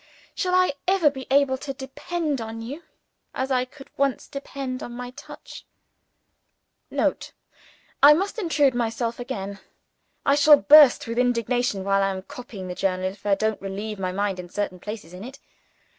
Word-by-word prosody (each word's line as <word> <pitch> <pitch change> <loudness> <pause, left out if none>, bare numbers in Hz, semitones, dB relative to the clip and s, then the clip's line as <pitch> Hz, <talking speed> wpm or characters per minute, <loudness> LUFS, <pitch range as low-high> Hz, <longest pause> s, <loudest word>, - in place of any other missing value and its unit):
shall 365 -2 0
I 365 -5 +3
ever 365 -6 +4
be 265 -2 -8
able 270 -1 +3
to 275 - -5
depend 285 +2 -3
on 225 0 -6
you 260 +8 -7 0.5
as 265 +1 -2
I 255 -1 +2
could 270 +2 -15
once 275 -2 0
depend 275 -2 -6
on 240 - -7
my 245 0 -6
touch? 280 +3 -11 1.3
[Note. - - -1 0.7
I 290 +2 +9
must 395 +7 -2
intrude 300 - +2
myself 235 0 -2
again. 200 -6 -5 0.7
I 280 - +4
shall 295 +1 +7
burst 290 -2 +7
with 230 +1 -3
indignation 245 -3 0
while 195 0 +2
I 195 - +2
am 190 -1 -5
copying 205 -5 -9
the 180 - -4
journal, 185 0 -1
if 200 +1 -11
I 200 - +4
don't 220 +1 -1
relieve 200 +2 -5
my 185 -1 -2
mind 195 0 -2
at 175 -1 -9
certain 200 -3 -3
places 210 -4 -8
in 180 +2 -9
it. 260 +4 -9
245 Hz, 170 wpm, -24 LUFS, 200-280 Hz, 1.3 s, I